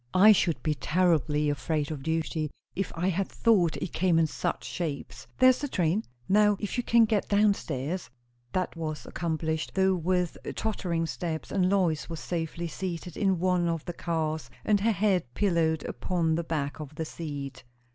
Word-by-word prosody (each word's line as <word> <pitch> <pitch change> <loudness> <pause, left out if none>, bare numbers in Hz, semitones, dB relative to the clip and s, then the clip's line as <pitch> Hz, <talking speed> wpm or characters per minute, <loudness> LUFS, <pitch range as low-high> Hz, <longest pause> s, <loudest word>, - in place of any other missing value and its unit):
"I 205 +4 +8
should 175 -5 +2
be 155 - +1
terribly 150 0 +2
afraid 150 +1 -1
of 150 -3 -5
duty, 160 0 -1 0.3
if 195 -1 -2
I 180 +3 +1
thought 190 -5 +2
it 180 - -5
came 175 -2 +3
in 165 - +4
such 155 - -2
shapes. 160 -5 -5
There's 255 0 +6
the 290 - -2
train! 180 - +1 0.2
Now 210 0 +4
if 210 - -3
you 245 - 0
can 235 -1 +5
get 215 -2 0
downstairs 185 -6 +1 0.2
" 120 0 -41
That 185 -1 -1
was 155 -2 -4
accomplished, 160 -1 -2
though 190 0 +4
with 180 0 0 0.2
tottering 175 -6 -1
steps, 160 -1 -4
and 185 -2 +2
Lois 180 -6 +1
was 165 -2 -5
safely 170 0 -3
seated 175 0 -5
in 190 -2 +2
one 180 0 +2
of 165 -2 -2
the 175 - -4
cars, 160 -6 -2 0.2
and 210 -1 +3
her 225 +3 +2
head 190 - +1
pillowed 165 -6 +1
upon 165 +4 0
the 170 +2 0
back 150 -3 -3
of 150 -1 -8
the 160 - -3
seat. 145 -5 -6
170 Hz, 175 wpm, -28 LUFS, 155-190 Hz, 0.3 s, I